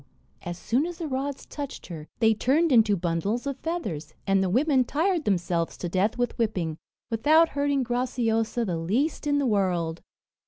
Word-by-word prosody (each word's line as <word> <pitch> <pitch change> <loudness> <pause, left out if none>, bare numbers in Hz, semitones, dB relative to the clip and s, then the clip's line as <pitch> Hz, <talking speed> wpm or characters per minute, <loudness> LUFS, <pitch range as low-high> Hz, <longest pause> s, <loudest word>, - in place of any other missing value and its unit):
as 175 -1 -5
soon 250 - 0
as 350 -1 -7
the 330 -2 -4
rods 275 0 -3
touched 285 -2 -7
her, 160 -3 -8
they 225 -1 +4
turned 290 +9 +2
into 220 -4 +5
bundles 180 +8 -1
of 275 -1 -3
feathers, 195 - -4
and 195 -1 +3
the 190 - +1
women 260 - +3
tired 325 +5 0
themselves 175 -3 0
to 175 - -4
death 190 +6 0
with 245 0 -1
whipping, 185 -8 -1 0.4
without 310 +9 +4
hurting 285 -1 0
Graciosa 240 -2 0
the 175 -5 -2
least 245 - -1
in 290 0 +2
the 285 - +1
world! 180 -7 0
230 Hz, 170 wpm, -26 LUFS, 185-285 Hz, 0.4 s, into